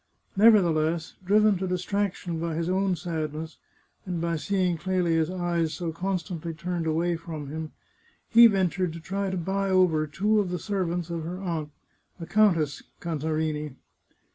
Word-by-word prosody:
Nevertheless, 170 Hz, -6 st, +4 dB
driven 210 Hz, 0 st, +4 dB
to 190 Hz, -, -2 dB
distraction 180 Hz, -2 st, -2 dB
by 165 Hz, -1 st, -2 dB
his 165 Hz, +1 st, -1 dB
own 190 Hz, 0 st, +1 dB
sadness, 160 Hz, -2 st, -4 dB, 0.5 s
and 180 Hz, -3 st, -3 dB
by 170 Hz, 0 st, -1 dB
seeing 185 Hz, +1 st, 0 dB
Clelia's 170 Hz, -2 st, +1 dB
eyes 175 Hz, -3 st, -1 dB
so 170 Hz, -2 st, -3 dB
constantly 175 Hz, -2 st, -3 dB
turned 170 Hz, 0 st, -3 dB
away 170 Hz, +2 st, +1 dB
from 160 Hz, -3 st, -7 dB
him, 160 Hz, 0 st, -5 dB, 0.6 s
he 235 Hz, 0 st, +8 dB
ventured 185 Hz, -4 st, 0 dB
to 165 Hz, -, -7 dB
try 195 Hz, +4 st, -3 dB
to 190 Hz, -, -2 dB
buy 195 Hz, +3 st, -1 dB
over 175 Hz, -5 st, +3 dB
two 210 Hz, +8 st, +1 dB
of 200 Hz, -3 st, 0 dB
the 180 Hz, -, -2 dB
ser 195 Hz, +1 st, -2 dB
vants 175 Hz, 0 st, -3 dB
of 165 Hz, -1 st, -3 dB
her 175 Hz, +3 st, -5 dB
aunt, 165 Hz, -5 st, -3 dB, 0.5 s
the 165 Hz, -, -5 dB
Countess 170 Hz, -8 st, +2 dB, 0.2 s
Cantarini. 155 Hz, -3 st, -2 dB
175 Hz, 155 wpm, -26 LUFS, 160-190 Hz, 0.6 s, he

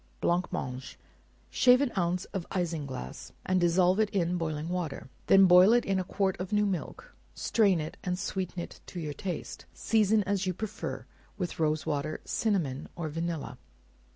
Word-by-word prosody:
Blancmange. 135 Hz, -7 st, -2 dB, 0.5 s
Shave 250 Hz, 0 st, +6 dB
an 280 Hz, -3 st, +1 dB
ounce 180 Hz, 0 st, 0 dB
of 185 Hz, -3 st, -4 dB
isinglass, 155 Hz, -, -4 dB
and 185 Hz, -1 st, +2 dB
dissolve 180 Hz, +3 st, +3 dB
it 215 Hz, -1 st, +3 dB
in 180 Hz, -3 st, 0 dB
boiling 160 Hz, -2 st, -2 dB
water; 170 Hz, -7 st, -4 dB, 0.2 s
then 195 Hz, 0 st, +7 dB
boil 180 Hz, +4 st, +7 dB
it 240 Hz, -, +3 dB
in 195 Hz, -1 st, +1 dB
a -, -, 0 dB
quart 190 Hz, +1 st, 0 dB
of 185 Hz, 0 st, -5 dB
new 210 Hz, 0 st, +3 dB
milk; 200 Hz, -, -4 dB, 0.2 s
strain 200 Hz, -6 st, +2 dB
it 155 Hz, +4 st, -5 dB
and 180 Hz, -1 st, -1 dB
sweeten 190 Hz, -2 st, -3 dB
it 170 Hz, -, -7 dB
to 180 Hz, -, -6 dB
your 150 Hz, -3 st, -4 dB
taste; 180 Hz, +5 st, -6 dB
season 215 Hz, -1 st, +3 dB
as 195 Hz, -1 st, -1 dB
you 185 Hz, -, -1 dB
prefer, 220 Hz, +2 st, -5 dB, 0.3 s
with 180 Hz, -5 st, -4 dB
rose 155 Hz, -1 st, +1 dB
water, 150 Hz, +1 st, -2 dB
cinnamon, 165 Hz, -, -1 dB
or 165 Hz, -3 st, -3 dB
vanilla. 165 Hz, 0 st, -4 dB
180 Hz, 165 wpm, -29 LUFS, 165-195 Hz, 0.5 s, then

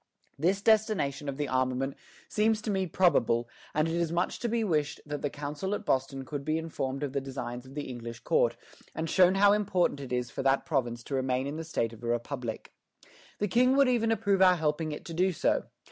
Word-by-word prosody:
This 190 Hz, +6 st, +1 dB
destination 205 Hz, -11 st, +2 dB
of 135 Hz, -, -5 dB
the 145 Hz, -1 st, -1 dB
armament 130 Hz, +1 st, 0 dB, 0.3 s
seems 215 Hz, 0 st, +2 dB
to 215 Hz, -, -1 dB
me 190 Hz, -2 st, 0 dB
probable, 120 Hz, -10 st, +2 dB, 0.2 s
and 155 Hz, +1 st, +1 dB
it 165 Hz, -, -2 dB
is 170 Hz, -1 st, 0 dB
much 175 Hz, +1 st, -1 dB
to 235 Hz, -, -1 dB
be 230 Hz, 0 st, +1 dB
wished 150 Hz, -7 st, 0 dB
that 145 Hz, -1 st, -4 dB
the 145 Hz, -, -1 dB
Council 150 Hz, +8 st, -3 dB
at -, -, -7 dB
Boston 135 Hz, 0 st, 0 dB
could 145 Hz, 0 st, -5 dB
be 155 Hz, +2 st, 0 dB
informed 140 Hz, -4 st, -3 dB
of 140 Hz, -2 st, -3 dB
the 140 Hz, -, 0 dB
designs 130 Hz, -2 st, -6 dB
of 135 Hz, -, -13 dB
the 145 Hz, -, -3 dB
English 120 Hz, -2 st, -7 dB
court, -, -, +2 dB, 0.4 s
and 160 Hz, +1 st, -2 dB
shown 185 Hz, +3 st, +5 dB
how 200 Hz, +1 st, +6 dB
important 185 Hz, -7 st, +1 dB
it 135 Hz, -3 st, -7 dB
is 125 Hz, -1 st, -1 dB
for -, -, -4 dB
that 135 Hz, 0 st, +2 dB
province 120 Hz, -7 st, -1 dB
to 140 Hz, -, -7 dB
remain 130 Hz, 0 st, 0 dB
in 145 Hz, +2 st, -4 dB
the 165 Hz, -, -4 dB
state 120 Hz, -8 st, -2 dB
of 115 Hz, +1 st, -13 dB
a -, -, -3 dB
republic. 120 Hz, 0 st, -3 dB, 0.7 s
The 205 Hz, -, 0 dB
King 250 Hz, +6 st, +4 dB
would 280 Hz, -1 st, +6 dB
even 230 Hz, -3 st, +2 dB
approve 200 Hz, -3 st, +1 dB
our 185 Hz, -1 st, +7 dB
helping 155 Hz, -1 st, -1 dB
it 150 Hz, -, -7 dB
to 165 Hz, -, -6 dB
do 185 Hz, +3 st, +2 dB
so. 175 Hz, -, +1 dB
150 Hz, 220 wpm, -29 LUFS, 135-190 Hz, 0.7 s, our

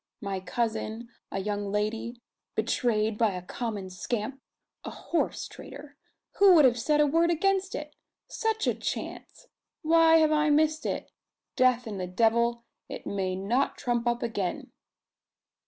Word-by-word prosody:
My 195 Hz, -2 st, -3 dB
cousin, 225 Hz, +2 st, -3 dB, 0.2 s
a -, -, -3 dB
young 205 Hz, 0 st, -2 dB
lady, 225 Hz, +3 st, -2 dB, 0.3 s
betrayed 220 Hz, -1 st, 0 dB
by 220 Hz, -4 st, +3 dB
a 180 Hz, -, -6 dB
common 205 Hz, -2 st, -5 dB
scamp 235 Hz, +7 st, -4 dB, 0.4 s
a -, -, -5 dB
horse, 340 Hz, -, -2 dB
trader 285 Hz, +1 st, -11 dB, 0.4 s
who 395 Hz, -2 st, +8 dB
would 305 Hz, -4 st, +7 dB
have 245 Hz, -2 st, +3 dB
said 300 Hz, +6 st, +2 dB
a 300 Hz, -, +6 dB
word 330 Hz, +4 st, +3 dB
against 385 Hz, +3 st, +1 dB
it? 300 Hz, 0 st, -7 dB, 0.3 s
Such 445 Hz, -1 st, -1 dB
a -, -, +2 dB
chance! -, -, -6 dB, 0.4 s
Why 325 Hz, 0 st, +6 dB
have 315 Hz, -1 st, +4 dB
I 300 Hz, 0 st, +3 dB
missed 310 Hz, +1 st, +2 dB
it? -, -, -4 dB, 0.4 s
Death 255 Hz, -1 st, +3 dB
and 210 Hz, -4 st, -5 dB
the 180 Hz, -, -3 dB
devil 235 Hz, +4 st, +1 dB, 0.2 s
it -, -, -7 dB
may 190 Hz, -2 st, -2 dB
not 225 Hz, +8 st, 0 dB
trump 240 Hz, -1 st, -1 dB
up 240 Hz, 0 st, 0 dB
again!" 205 Hz, -6 st, -3 dB
235 Hz, 150 wpm, -28 LUFS, 210-300 Hz, 0.4 s, who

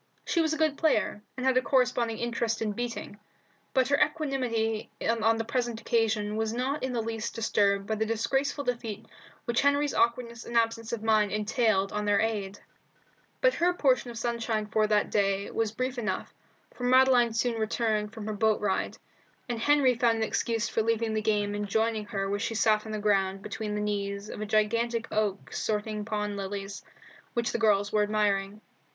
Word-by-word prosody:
She 335 Hz, -, +1 dB
was 320 Hz, -1 st, +1 dB
a 320 Hz, -, -1 dB
good 310 Hz, -2 st, +1 dB
player, 255 Hz, -9 st, +1 dB, 0.2 s
and 255 Hz, -, -3 dB
had 260 Hz, -1 st, +3 dB
a -, -, +5 dB
corresponding 245 Hz, -3 st, +1 dB
interest 235 Hz, -1 st, -1 dB
in 220 Hz, -2 st, -1 dB
beating, 230 Hz, -2 st, -5 dB, 0.5 s
but 260 Hz, -2 st, +2 dB
her 285 Hz, -, +3 dB
equanimity 250 Hz, -8 st, -1 dB, 0.2 s
on 225 Hz, 0 st, +2 dB
the 225 Hz, -, -1 dB
present 240 Hz, -1 st, -2 dB
occasion 220 Hz, -2 st, 0 dB
was 220 Hz, 0 st, -1 dB
not 260 Hz, +5 st, -1 dB
in 260 Hz, -, -2 dB
the 235 Hz, -2 st, -1 dB
least 225 Hz, 0 st, -4 dB
disturbed 200 Hz, -3 st, +1 dB
by 220 Hz, -, -2 dB
the 220 Hz, 0 st, 0 dB
disgraceful 270 Hz, +6 st, 0 dB
defeat 230 Hz, -4 st, -3 dB, 0.4 s
which 235 Hz, 0 st, +1 dB
Henry's 285 Hz, 0 st, +2 dB
awkwardness 235 Hz, 0 st, 0 dB
and 235 Hz, -, -2 dB
absence 230 Hz, 0 st, 0 dB
of 230 Hz, -2 st, -3 dB
mind 215 Hz, -2 st, +3 dB
entailed 210 Hz, -2 st, +1 dB
on 210 Hz, 0 st, -2 dB
their 205 Hz, -1 st, +3 dB
aide. 205 Hz, -3 st, -1 dB, 0.8 s
But -, -, +4 dB
her 350 Hz, +1 st, +1 dB
portion 255 Hz, -6 st, +2 dB
of 235 Hz, -, -7 dB
sunshine 230 Hz, -2 st, -1 dB
for 215 Hz, 0 st, +1 dB
that 210 Hz, -1 st, +1 dB
day 200 Hz, -1 st, +1 dB
was 225 Hz, -2 st, 0 dB
brief 255 Hz, +2 st, -3 dB
enough, 215 Hz, -, -3 dB, 0.4 s
for 245 Hz, -, -9 dB
Madeline 255 Hz, -2 st, +5 dB
soon 230 Hz, 0 st, 0 dB
returned 215 Hz, -1 st, 0 dB
from 220 Hz, -2 st, -8 dB
her 215 Hz, -, -3 dB
boat 215 Hz, +1 st, +2 dB
ride, 200 Hz, -2 st, -1 dB, 0.5 s
and 240 Hz, -2 st, -3 dB
Henry 280 Hz, 0 st, +4 dB
found 230 Hz, -1 st, +2 dB
an 225 Hz, -, 0 dB
excuse 225 Hz, 0 st, 0 dB
for 225 Hz, -, 0 dB
leaving 225 Hz, 0 st, 0 dB
the 215 Hz, -, 0 dB
game 210 Hz, -1 st, 0 dB
and 205 Hz, 0 st, -3 dB
joining 220 Hz, +1 st, 0 dB
her 195 Hz, -3 st, -3 dB
where 200 Hz, +1 st, -1 dB
she 225 Hz, -, -2 dB
sat 215 Hz, 0 st, +2 dB
on -, -, -6 dB
the 215 Hz, -, -2 dB
ground 195 Hz, -2 st, +1 dB
between 210 Hz, 0 st, -4 dB
the -, -, -1 dB
knees 200 Hz, 0 st, -3 dB
of -, -, -7 dB
a 215 Hz, -, -3 dB
gigantic 225 Hz, +2 st, +1 dB
oak 210 Hz, -2 st, -1 dB
sorting 210 Hz, 0 st, -2 dB
pond 210 Hz, -2 st, -2 dB
lilies, 195 Hz, 0 st, -5 dB, 0.5 s
which 235 Hz, -1 st, 0 dB
the -, -, -2 dB
girls 205 Hz, -2 st, +3 dB
were 210 Hz, -, +3 dB
admiring. 205 Hz, -1 st, 0 dB
225 Hz, 190 wpm, -28 LUFS, 210-240 Hz, 0.8 s, a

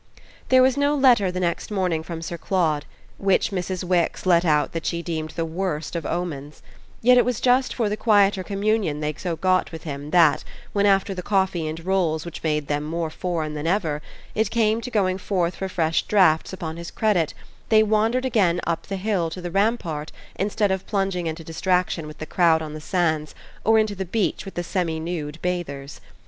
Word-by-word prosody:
There 255 Hz, 0 st, +6 dB
was 260 Hz, +1 st, +3 dB
no 285 Hz, +1 st, +2 dB
letter 245 Hz, -9 st, +4 dB
the 180 Hz, -, -3 dB
next 170 Hz, -2 st, -1 dB
morning 185 Hz, -6 st, 0 dB
from 165 Hz, 0 st, -6 dB
Sir 170 Hz, -, -4 dB
Claude 165 Hz, -4 st, 0 dB, 0.3 s
which 195 Hz, 0 st, +2 dB
Mrs. 185 Hz, -1 st, -3 dB
Wix 180 Hz, -1 st, 0 dB
let 175 Hz, -2 st, +4 dB
out 150 Hz, -3 st, +2 dB
that 165 Hz, -1 st, -4 dB
she 170 Hz, 0 st, -2 dB
deemed 160 Hz, -2 st, -3 dB
the 165 Hz, -, -1 dB
worst 165 Hz, -2 st, -3 dB
of 165 Hz, -3 st, -3 dB
omens; 150 Hz, -5 st, -4 dB, 0.4 s
yet 250 Hz, +1 st, +7 dB
it -, -, +5 dB
was 250 Hz, -3 st, -1 dB
just 255 Hz, +1 st, +2 dB
for 230 Hz, -4 st, +1 dB
the 205 Hz, -, -1 dB
quieter 205 Hz, -3 st, +3 dB
communion 200 Hz, -5 st, 0 dB
they 150 Hz, 0 st, -2 dB
so 170 Hz, +2 st, -3 dB
got 185 Hz, +2 st, +1 dB
with 160 Hz, -1 st, -8 dB
him 145 Hz, -1 st, -6 dB
that, 170 Hz, -2 st, +4 dB, 0.3 s
when 205 Hz, 0 st, +3 dB
after 195 Hz, 0 st, +3 dB
the 185 Hz, -, -5 dB
coffee 190 Hz, -4 st, 0 dB
and 160 Hz, +2 st, -6 dB
rolls 175 Hz, -5 st, +1 dB
which 170 Hz, -, -7 dB
made 150 Hz, -2 st, 0 dB
them 145 Hz, +1 st, -1 dB
more 160 Hz, +1 st, -3 dB
foreign 160 Hz, -3 st, -3 dB
than 150 Hz, +1 st, -3 dB
ever, 165 Hz, -5 st, 0 dB, 0.3 s
it 220 Hz, -1 st, +1 dB
came 225 Hz, 0 st, +1 dB
to 240 Hz, -, -5 dB
going 190 Hz, -5 st, +1 dB
forth 180 Hz, -3 st, -1 dB
for 190 Hz, -, -3 dB
fresh 165 Hz, -3 st, +1 dB
drafts 180 Hz, -6 st, +3 dB
upon 165 Hz, -4 st, -5 dB
his 170 Hz, -1 st, -6 dB
credit 190 Hz, -8 st, +1 dB, 0.3 s
they 220 Hz, -1 st, +6 dB
wandered 220 Hz, +4 st, +1 dB
again 190 Hz, -9 st, +2 dB
up 170 Hz, -1 st, -2 dB
the 195 Hz, -, -3 dB
hill 190 Hz, -4 st, 0 dB
to 170 Hz, -, -7 dB
the 175 Hz, -1 st, -5 dB
rampart 180 Hz, -7 st, 0 dB, 0.2 s
instead 205 Hz, +1 st, 0 dB
of 190 Hz, -1 st, -2 dB
plunging 195 Hz, -4 st, -1 dB
into 160 Hz, +1 st, -4 dB
distraction 175 Hz, 0 st, 0 dB
with 150 Hz, -, -10 dB
the 155 Hz, -, -6 dB
crowd 165 Hz, -2 st, +3 dB
on 155 Hz, -1 st, -6 dB
the 155 Hz, -, -7 dB
sands 160 Hz, -3 st, 0 dB, 0.3 s
or 225 Hz, 0 st, +4 dB
into 215 Hz, -1 st, +2 dB
the 190 Hz, -3 st, -5 dB
sea 220 Hz, -4 st, +1 dB
with 195 Hz, -, -9 dB
the 175 Hz, -, -2 dB
semi 170 Hz, -3 st, -1 dB
nude 160 Hz, -2 st, -4 dB
bathers. 150 Hz, -6 st, -4 dB
180 Hz, 205 wpm, -23 LUFS, 160-200 Hz, 0.4 s, yet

